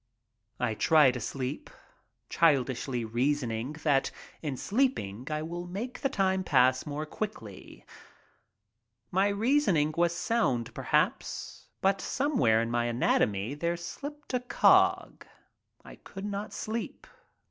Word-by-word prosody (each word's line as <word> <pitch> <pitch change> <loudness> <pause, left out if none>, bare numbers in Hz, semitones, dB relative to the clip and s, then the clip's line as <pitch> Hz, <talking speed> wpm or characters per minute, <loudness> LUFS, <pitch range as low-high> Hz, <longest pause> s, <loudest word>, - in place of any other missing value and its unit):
I 110 - 0
try 150 +3 +5
to 125 - -5
sleep, 130 +4 -4 0.6
childishly 130 -5 +1
reasoning 120 +1 -1
that 140 -3 +2 0.3
in 145 -5 -3
sleeping 170 - -1
I 155 0 -2
will 175 +2 -5
make 215 +8 -5
the 275 - +1
time 190 -6 +1
pass 130 -3 +3
more 150 +1 -3
quickly. 155 - -7 1.3
My 190 +2 +3
reasoning 200 - +2
was 170 0 +2
sound, 175 - 0
perhaps, - - -1
but 195 0 +2
somewhere 125 - +2
in 115 - -4
my 120 0 +1
anatomy 115 -2 +1
there 170 +4 -2
slipped 285 - -8
a 250 - +2
cog. 245 0 +3 0.6
I - - -12
could 195 +1 -9
not 205 +1 -4
sleep. 225 +1 -5
155 Hz, 120 wpm, -29 LUFS, 125-200 Hz, 1.3 s, try